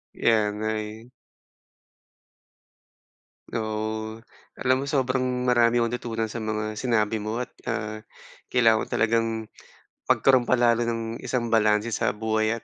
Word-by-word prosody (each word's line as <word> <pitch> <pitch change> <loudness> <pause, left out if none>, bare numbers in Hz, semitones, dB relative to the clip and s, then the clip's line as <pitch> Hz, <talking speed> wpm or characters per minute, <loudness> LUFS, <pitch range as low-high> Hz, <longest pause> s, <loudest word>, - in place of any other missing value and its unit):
Yan, 105 -2 +1
ay 110 +2 -4 2.4
Oo, 110 0 -3 0.4
alam 130 0 +2
mo 140 - -3
sobrang 130 -2 +1 0.2
marami 120 -1 +4
ako 120 - +3
natutunan 115 -2 -2
sa 110 +1 -5
mga 110 0 -2
sinabi 110 -2 0
mo 110 +2 -3
at, 125 - -5 0.2
ah, 110 -1 -3 0.5
kailangan 115 -3 +4
ko - - -3
talagang 115 0 +2 0.8
magkaroon 130 -3 +4
pa - - +4
lalo 120 -1 +3
ng 115 0 -3
isang 120 -3 -2
balanse 105 0 +3
sa 105 - 0
buhay 110 +1 0
115 Hz, 125 wpm, -25 LUFS, 110-120 Hz, 2.4 s, marami